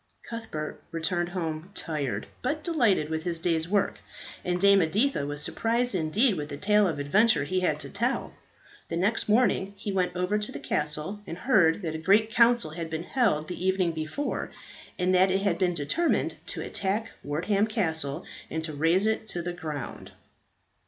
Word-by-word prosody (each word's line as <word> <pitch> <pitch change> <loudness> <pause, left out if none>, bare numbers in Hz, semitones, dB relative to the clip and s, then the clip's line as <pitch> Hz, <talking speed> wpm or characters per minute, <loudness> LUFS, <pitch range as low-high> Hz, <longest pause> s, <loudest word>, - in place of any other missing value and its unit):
Cuthbert 225 -10 -6
returned 170 +1 -1
home 165 -1 -4
tired, 140 - -2 0.2
but 300 +4 -2
delighted 235 - +2
with 160 0 -1
his 170 0 -2
day's 165 0 0
work, 200 -1 +1 0.4
and 180 0 -1
Dame 200 +1 +6
Editha 185 - +1
was 145 0 -1
surprised 235 +1 0
indeed 190 +6 +2
with 150 -1 -4
the 145 - -5
tale 210 +4 +3
of 160 -4 -2
adventure 150 +6 +3
he 185 +6 0
had 155 -5 0
to - - -6
tell. 235 +6 -1 0.6
The 165 - -2
next 205 +5 +1
morning 210 -3 +2
he 200 - -4
went 185 -2 0
over 180 +4 0
to 210 - -3
the - - -6
castle, 150 +7 -1
and 165 - -5
heard 195 -6 +3
that 160 -2 -2
a 160 - -4
grand 205 +6 +3
council 235 -7 +4
had 165 0 -5
been 160 +1 -3
held 175 - +1
the 180 0 -5
evening 185 -2 +2
before, 160 - -3 0.5
and 180 0 +1
that 185 +1 +5
it 190 +1 +1
had 190 -4 +1
been 180 -2 +2
determined 170 - 0
to - - -4
attack 205 +3 -2
Wortham 195 +9 +1
Castle 160 - 0 0.2
and 160 0 -3
to 155 -1 -4
raze 165 +7 +2
it 220 0 0
to 175 -4 -3
the 175 0 -3
ground. 155 -6 -6
180 Hz, 180 wpm, -27 LUFS, 160-210 Hz, 0.6 s, Dame